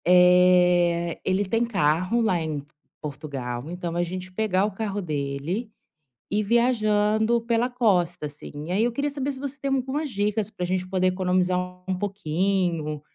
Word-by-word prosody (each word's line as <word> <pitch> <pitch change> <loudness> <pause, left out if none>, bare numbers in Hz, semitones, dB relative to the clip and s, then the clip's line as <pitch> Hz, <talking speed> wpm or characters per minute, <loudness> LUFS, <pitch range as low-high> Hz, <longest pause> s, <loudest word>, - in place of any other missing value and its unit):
Eh, 180 -1 +5
ele 190 +2 +1
tem 225 +5 +1
carro 185 0 +1
lá 185 -7 +1
em 150 -3 -4 0.3
Portugal, 140 -3 -5
então 175 -1 -4
a 175 - +1
gente 185 +1 -6
pegar 200 -2 +1
o 210 - -2
carro 205 0 -3
dele, 155 - -3 0.6
ir 210 +1 +1
viajando 220 -1 +2
pela 235 +1 +1
costa, 180 -10 +1
assim. 150 +2 -8
Aí 200 +4 +2
eu 240 - +1
queria 285 +4 -1
saber 280 0 -2
se 265 - -9
você 280 +1 -5
tem 275 -1 -1
algumas 270 +3 -1
dicas 210 -1 -1
pra 190 -4 -4
gente 185 0 -1
poder 185 -1 +1
economizar 185 0 +1 0.3
um 190 -1 -1
pouquinho, 180 -5 -1
185 Hz, 155 wpm, -25 LUFS, 170-220 Hz, 0.6 s, Eh